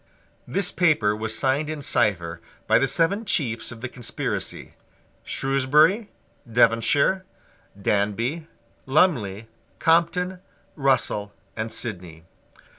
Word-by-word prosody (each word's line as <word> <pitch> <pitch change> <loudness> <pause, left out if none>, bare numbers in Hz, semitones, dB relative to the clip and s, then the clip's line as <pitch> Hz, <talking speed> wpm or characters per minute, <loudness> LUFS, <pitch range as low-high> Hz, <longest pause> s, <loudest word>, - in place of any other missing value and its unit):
This 195 -2 +1
paper 150 - +2
was 110 0 -3
signed 140 +3 0
in 155 -2 -5
cipher 90 -10 0 0.2
by - - +4
the 135 - +2
seven 180 +9 +1
chiefs 115 - -1
of 115 -1 -10
the 130 - -3
conspiracy, 120 -2 -4 0.5
Shrewsbury, 150 - +2 0.4
Devonshire, 120 - +3 0.6
Danby, 110 +11 -1 0.4
Lumley, 120 - +2 0.3
Compton, 180 +3 +2 0.4
Russell 130 -7 0 0.2
and 110 0 -4
Sidney. 90 -7 -5
130 Hz, 100 wpm, -24 LUFS, 110-160 Hz, 0.6 s, by